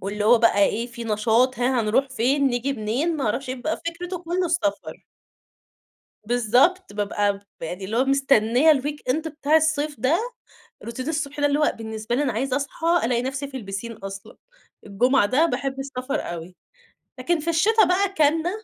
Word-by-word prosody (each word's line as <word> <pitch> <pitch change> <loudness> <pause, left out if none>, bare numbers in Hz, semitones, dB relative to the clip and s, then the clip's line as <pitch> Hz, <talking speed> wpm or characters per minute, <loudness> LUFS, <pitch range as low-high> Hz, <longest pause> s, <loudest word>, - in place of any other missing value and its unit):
واللي 205 +2 -3
هو 235 +1 +6
بقى 230 -3 +3
إيه، 230 +4 -1
في 235 -1 -8
نشاط 225 +4 +1
هاه، 250 0 +1
هنروح 235 +6 +1
فين؟ 265 +3 +1
نيجي 250 +2 0
منين؟ 265 +8 -1
ماعرفش 270 0 -2
إيه، 255 - -2
بيبقى 300 +6 -3
فِكرته 355 +2 -4
كلّه 355 +1 -1
السفر. 330 -2 -2 1.2
بالضبط، 245 - +2
بابقى 205 -1 0
ب 200 -4 -17
يعني 180 +4 -5
اللي 220 +4 -3
هو 260 - +3
مستنية 270 +1 +4
الweekend 290 0 -2
بتاع 300 0 0
الصيف 310 -2 +1
ده، 285 +7 +2 0.6
روتين 255 +5 -5
الصبح 295 -2 -3
ده 290 - +2
اللي 290 +1 +2
هو 300 - +2
بالنسبة 220 +1 -4
لي 290 - +1
أنا 255 - -1
عايزة 255 +4 -1
أصحى 285 +4 -3 0.2
ألاقي 240 0 +1
نفسي 270 +2 -4
في 270 -1 -7
البيسين 200 +1 -6
أصلًا، 195 -2 -9 0.5
الجمعة 240 +4 +2
ده 265 +10 +3
باحب 270 -1 -3
السفر 270 0 -3
أوي. 170 +1 -7 0.7
لكن 325 +5 0
في 335 - -2
الشتا 420 +6 +4
بقى 365 +3 +2
كانَّة 315 +3 +2
265 Hz, 170 wpm, -23 LUFS, 225-300 Hz, 1.2 s, هو